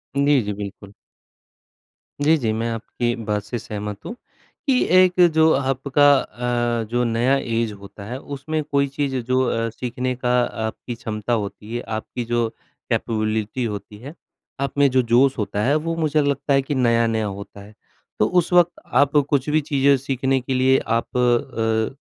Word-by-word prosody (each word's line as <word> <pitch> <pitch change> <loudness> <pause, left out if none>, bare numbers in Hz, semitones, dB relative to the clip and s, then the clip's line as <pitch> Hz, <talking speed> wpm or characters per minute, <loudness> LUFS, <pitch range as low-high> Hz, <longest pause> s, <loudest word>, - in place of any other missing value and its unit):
जी, 140 -1 +3
जी, 105 -1 -3
बिल्कुल। 100 0 -8 1.3
जी, 155 +3 +5
जी, 115 -7 -1
मैं 115 +1 -2
आपकी 120 +1 -2
बात 105 -1 -1
से 120 +4 -5
सहमत 105 -1 -6
हूँ, 235 - -6 0.5
कि 255 -2 +3
एक 185 0 +5
जो 160 0 +5
आपका 135 +1 +3
अ, 120 -2 -2
जो 120 0 +1
नया 120 +4 +2
एज़ 115 -4 -1
होता 100 0 -11
है, 125 +5 -5
उसमें 145 +3 -4
कोई 140 -1 +1
चीज़ 140 -1 -2
जो 130 +1 +2
अ, 115 0 -1
सीखने 125 +2 -3
का 125 0 -2 0.4
आपकी 115 +2 -6
क्षमता 110 0 -3
होती 105 +1 -4
है, 120 - -2 0.2
आपकी 120 +2 -5
जो 120 0 0 0.4
कैपेबिलिटी 110 +2 -1
होती 105 -1 -5
है, 135 +8 -10 0.5
आप 140 +1 -3
में 140 -1 +5
जो 130 0 +4
जोश 130 +3 +4
होता 105 -1 -2
है, 140 +3 +3
वो 165 +2 -1
मुझे 155 -2 +1
लगता 140 0 0
है 135 - +4
कि 140 +2 -3
नया-नया 115 -3 +2
होता 100 0 -7
है। 105 +2 -14 0.5
तो - - +4
उस 175 - -2
वक़्त 175 -1 +5
आप 145 +1 +2
कुछ 140 0 +1
भी 155 +1 +2
चीज़ें 140 -1 +3
सीखने 135 0 0
के 130 +2 -3
लिए 130 +1 +4
आप 115 +2 -1
अ, 120 -1 +1
125 Hz, 170 wpm, -22 LUFS, 110-140 Hz, 1.3 s, जी